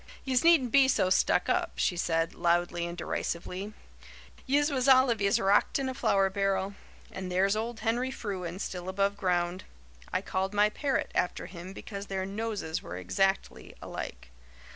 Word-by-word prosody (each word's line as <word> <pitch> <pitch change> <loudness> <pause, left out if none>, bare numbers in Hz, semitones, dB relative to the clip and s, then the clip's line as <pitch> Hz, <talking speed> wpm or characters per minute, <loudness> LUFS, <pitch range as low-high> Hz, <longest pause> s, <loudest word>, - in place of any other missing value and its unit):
"Yez 260 -2 +2
needn't 320 -8 +5
be 275 -1 +6
so 185 -8 +2
stuck - - +3
up," - - 0
she 180 - +1
said, 165 -1 0
loudly 175 0 +1
and 170 0 -7
derisively. 180 +4 -4 0.8
"Yez 290 +3 +2
was 260 -1 0
all 260 -1 +6
of 225 - -2
yez 200 0 +3
rocked 195 +1 +3
in 270 -1 -2
a 260 - -2
flour 195 -6 +2
barrel. 195 0 0 0.4
And 185 -1 -6
there's 195 +3 +2
old 225 +1 -4
Henry 240 +3 0
Frewen, 185 -8 -5
still 185 -2 -5
above 200 +1 +1
ground. 180 -2 -1 0.5
I 190 - -1
called 190 +1 -2
my 210 +1 +5
parrot 275 +3 -1
after 180 - -1
him 175 +1 -9
because 200 0 -7
their 190 -1 -2
noses 205 -5 -3
were 90 +1 -7
exactly 195 - -1
alike. - - -7
195 Hz, 165 wpm, -29 LUFS, 180-230 Hz, 0.8 s, be